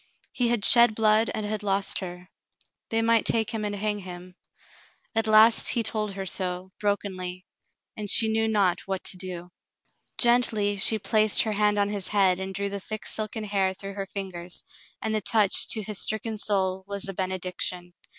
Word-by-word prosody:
He 245 - 0
had 235 -4 +1
shed 235 -2 +7
blood 220 0 +3
and 215 - -3
had 215 0 -3
lost 200 -1 0
her. 180 -1 -8 0.6
They 225 0 0
might 230 -1 +3
take 225 -2 0
him 220 -2 -3
and 205 -1 -3
hang 210 +1 -2
him. 180 -1 -10 0.8
At 225 -1 0
last 220 +1 +5
he 235 - +2
told 215 -2 -1
her 195 0 -6
so, 185 0 -3
brokenly, 185 -3 -3 0.5
and 210 -1 -5
she 225 - +6
knew 225 0 0
not 200 -5 +1
what 190 -2 -3
to 185 - -3
do. 180 -1 -7 0.7
Gently 230 -4 +2
she 220 +2 +4
placed 215 0 +2
her 220 - -2
hand 210 0 +1
on 200 0 +1
his 200 -2 -3
head 190 -3 +2
and 190 0 -5
drew 200 +1 -3
the 200 0 -4
thick 215 +2 -5
silken 215 0 -3
hair 195 -2 -1
through 195 +1 -8
her 195 -1 -6
fingers, 180 -3 -5 0.4
and 220 - -1
the 215 - -1
touch, 210 -1 +2
to 220 - -1
his 210 -1 -3
stricken 220 0 -2
soul, 190 -2 0
was 200 -1 -4
a 195 - -5
benediction. 180 -1 -4
205 Hz, 185 wpm, -25 LUFS, 190-215 Hz, 0.8 s, shed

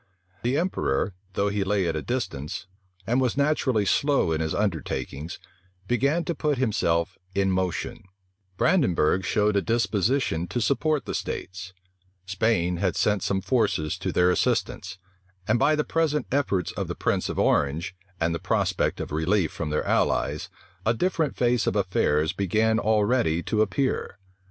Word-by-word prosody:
The 125 +4 0
emperor, 105 - 0 0.2
though 100 +1 +1
he 100 0 0
lay 95 -2 +1
at 80 - -1
a 75 - -2
distance, 85 - -4 0.4
and 120 +5 +1
was 125 0 0
naturally 140 -7 +2
slow 140 - +2
in 80 0 0
his 80 0 -1
undertakings, 80 - -3 0.5
began 140 - +1
to 170 - -1
put 150 -4 0
himself 95 -8 0 0.2
in 100 -1 +2
motion; 95 -1 -2 0.5
Brandenburgh 95 - +2
showed 105 +1 +1
a 100 - +3
disposition 115 -4 0
to 120 - -2
support 145 +4 +1
the - - -4
states; 95 +1 -5 0.5
Spain 95 -3 +1
had 90 -3 0
sent 105 -2 +1
some 95 -1 0
forces 100 -8 +1
to 95 -1 -2
their 90 +1 +3
assistance; 95 +1 -1 0.5
and 115 +2 +3
by 145 +3 +4
the 150 - +1
present 150 -4 0
efforts 125 - 0
of - - -4
the - - -4
prince - - 0
of - - -4
Orange, 80 +6 +1 0.2
and 85 0 +1
the 85 - -2
prospect - - 0
of - - -5
relief 80 +3 +1
from 75 - -4
their 75 - -1
allies, - - 0 0.3
a 115 +1 +2
different 165 0 0
face 120 -2 +2
of - - +1
affairs 80 -6 +1
began 110 +3 +1
already 105 -6 +2
to 110 - 0
appear. 110 +6 -1
100 Hz, 155 wpm, -25 LUFS, 85-125 Hz, 0.5 s, by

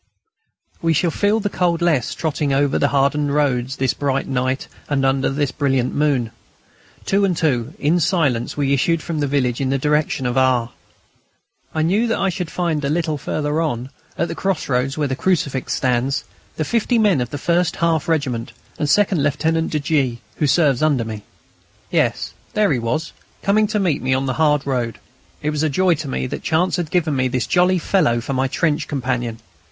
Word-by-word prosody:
We 165 -1 +2
shall 165 +2 +1
feel 205 +6 +1
the 205 - -1
cold 175 -2 +1
less 160 -9 +1
trotting 150 -2 -1
over 140 0 +2
the 140 - +3
hardened 140 +1 +1
roads 135 -3 +1
this 130 -2 0
bright 140 -1 -1
night 130 0 -1 0.2
and 140 -2 +1
under 135 0 +2
this 140 0 -1
brilliant 135 -4 0
moon. 140 -6 +1 0.7
Two 200 +1 +2
and 185 -4 +1
two, 135 -2 0
in 160 +5 +2
silence, 150 -10 0
we 140 -1 +1
issued 165 +4 +1
from 165 -3 -3
the 145 - 0
village 130 -3 0
in 135 - 0
the 135 - +1
direction 150 -1 0
of 125 +1 +1
R. 125 -2 +2 1.0
I 155 - +1
knew 200 +8 +2
that 225 - 0
I 195 - +1
should 180 -1 -4
find 165 -4 -1
a 140 - 0
little 155 -1 -1
further 150 +2 -1
on, 130 -5 -2 0.3
at 170 - 0
the 165 - -4
cross 190 0 -2
roads 130 +2 0
where 150 -2 0
the 130 - -2
crucifix 140 -6 0
stands, 130 +1 0 0.3
the 155 - -2
fifty 235 +4 +1
men 205 - +3
of 120 - -2
the 145 - -5
first 170 +4 +1
half 165 -2 +1
regiment 130 -8 -1 0.3
and 150 -1 0
Second 195 -4 +3
Lieutenant 160 +3 0
de 150 - 0
G., 140 -5 0 0.2
who 150 - +1
serves 140 -4 +3
under 145 -7 +2
me. 110 -1 -6 0.7
Yes, - - 0 0.2
there 210 -1 +3
he 130 - +1
was, 120 +8 -2 0.3
coming 210 +2 +3
to 215 +1 -1
meet 180 -8 +1
me 130 0 +1
on 135 +1 -1
the 130 - -1
hard 150 -2 +3
road. 125 -5 -2 0.5
It 150 - 0
was 150 -1 -2
a 155 - +2
joy 180 +5 +3
to 150 -2 -4
me 130 - -2
that 125 - -5
chance 175 +4 +1
had 175 -4 -2
given 160 -5 +1
me 130 -1 +1
this 125 -1 -1
jolly 180 +1 +3
fellow 155 -9 +2
for 125 +4 -4
my 130 0 +1
trench 150 +3 0
companion. 125 -4 -2
145 Hz, 200 wpm, -20 LUFS, 130-165 Hz, 1.0 s, the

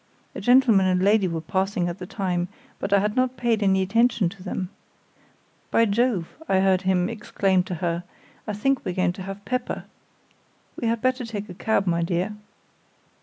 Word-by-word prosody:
A - - -6
gentleman 245 -6 +5
and 185 -1 +2
lady 200 -1 +4
were 165 -2 -3
passing 190 +1 -1
at 175 +1 -5
the 180 - -7
time, 180 -4 -1 0.3
but 195 - -3
I 200 - +6
had 210 +2 0
not 255 0 +1
paid 230 -3 +1
any 190 -1 +3
attention 225 -1 +2
to 195 +1 -13
them. 185 -1 -4 1.0
'By 230 - +4
Jove!' 210 -4 0
I 190 - +4
heard 190 -1 +3
him 185 -1 +2
exclaim 195 -4 0
to 180 - -4
her, 170 0 -2 0.4
'I 210 - -2
think 270 +6 0
we're 180 - -3
going 185 -2 +1
to 190 - -9
have 195 +1 -7
pepper. 250 +4 -2 0.9
We 235 - -2
had 230 0 -1
better 255 0 +1
take 210 -3 -5
a - - -7
cab, 200 +2 0
my 170 -2 +1
dear. 175 +4 -1
195 Hz, 185 wpm, -24 LUFS, 185-225 Hz, 1.0 s, I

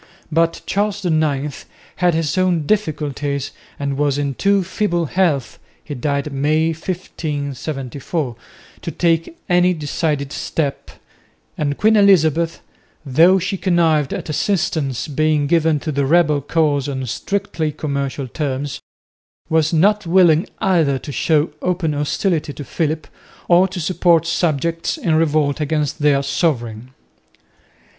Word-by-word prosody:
But 165 +1 +1
Charles 205 -1 -1
IX 150 -4 0 0.3
had 175 -2 +2
his 160 -2 0
own 180 -4 +1
difficulties 145 -7 -1 0.3
and 140 -1 -3
was 145 -1 +1
in 140 -1 -1
too 200 +6 +2
feeble 175 -2 -1
health 155 -6 0 0.2
(he 150 - -6
died 140 +2 -2
May, 155 +4 +1
1574) 145 -5 -4 0.5
to 170 - -4
take 165 - 0
any 180 0 +3
decided 150 -2 -2
step, 145 -4 -3 0.7
and 145 -1 -2
Queen 220 +1 +4
Elizabeth, 170 -5 +3 0.4
though 165 +8 +5
she 185 +1 -2
connived 165 -6 +2
at - - -4
assistance 155 - -1
being 155 0 +1
given 160 0 +2
to 155 - -3
the 140 -1 0
rebel 155 -2 +3
cause 145 -2 0
on 130 -2 -3
strictly 165 - -2
commercial 140 -2 -3
terms, 140 0 -3 0.7
was 160 -1 +2
not 200 +4 +2
willing 170 -2 +4
either 165 -8 +2
to 145 - -8
show 155 +3 +1
open 175 -4 0
hostility 150 +2 -1
to 145 - -7
Philip 155 +1 -2 0.4
or 180 +2 +5
to 180 -1 -6
support 170 -1 +2
subjects 170 - -1
in 195 - 0
revolt 155 -2 +1
against 150 0 -1
their 145 -2 +3
sovereign. 125 -6 -1
155 Hz, 125 wpm, -19 LUFS, 145-175 Hz, 0.7 s, though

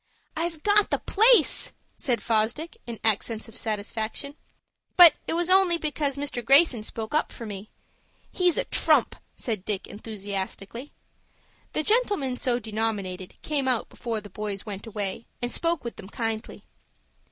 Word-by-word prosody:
"I've 330 -1 -3
got 415 0 +4
the - - +1
place," 455 +4 +4 0.2
said 245 -4 -1
Fosdick, 230 - 0
in 230 -2 -6
accents 220 +1 0
of 225 - -13
satisfaction; 220 +5 -3 0.6
"but 345 -4 +11
it - - 0
was 345 +2 +1
only 375 -2 +5
because 295 -3 -2
Mr. 280 -4 -3
Greyson 275 -1 +5
spoke 220 +2 -6
up 305 - +1
for 230 - -8
me." 205 0 -7 0.6
"He's 360 -2 +2
a - - +2
trump," - - +2 0.2
said 220 -7 -3
Dick, 205 -2 -2
enthusiastically. 205 +3 -6 0.8
The 310 - 0
gentleman, 410 - +2
so 250 -1 +1
denominated, 210 -5 -3
came 285 -3 -1
out 250 -3 0
before 230 -3 -4
the 205 -2 -12
boys 205 -1 -5
went 205 0 -6
away, 205 0 -4
and 245 0 -3
spoke 335 -3 +1
with 235 - -6
them 195 - -10
kindly. 225 -1 -4
235 Hz, 150 wpm, -26 LUFS, 215-310 Hz, 0.8 s, but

